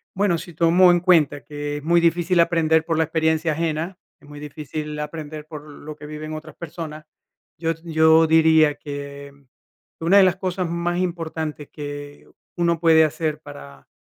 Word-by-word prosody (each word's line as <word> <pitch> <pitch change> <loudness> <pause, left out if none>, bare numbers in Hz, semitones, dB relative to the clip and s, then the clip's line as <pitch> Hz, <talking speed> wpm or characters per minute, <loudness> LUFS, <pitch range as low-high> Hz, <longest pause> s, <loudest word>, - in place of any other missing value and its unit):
Bueno, 190 -3 +1
si 175 +1 -9
tomo 175 +3 +5
en 175 - +3
cuenta 160 -6 +3
que 145 0 -5
es 145 - -9
muy 170 +2 +3
difícil 170 +1 +2
aprender 160 -2 +3
por 165 -1 -1
la 160 - +3
experiencia 160 0 0
ajena, 165 +3 -2 0.2
es - - -20
muy 145 0 -11
difícil 150 +1 -6
aprender, 150 0 -6
por 155 -1 -9
lo 150 +1 -10
que 150 - -11
viven 155 +1 -7
otras 155 0 -9
personas. 155 -2 -8 0.5
Yo 165 0 0
yo 160 -1 +4
diría 160 -2 +4
que, 140 -1 -8
mm, 140 -1 -24 0.6
una 195 +4 +5
de 195 - +8
las 185 -2 +3
cosas 185 -1 -2
más 170 +1 -2
importantes, 160 -4 -4
que 145 -1 -8 0.3
uno 170 -2 +1
puede 160 -1 +5
hacer 155 0 -2
para 70 - -12
160 Hz, 170 wpm, -22 LUFS, 150-170 Hz, 0.6 s, de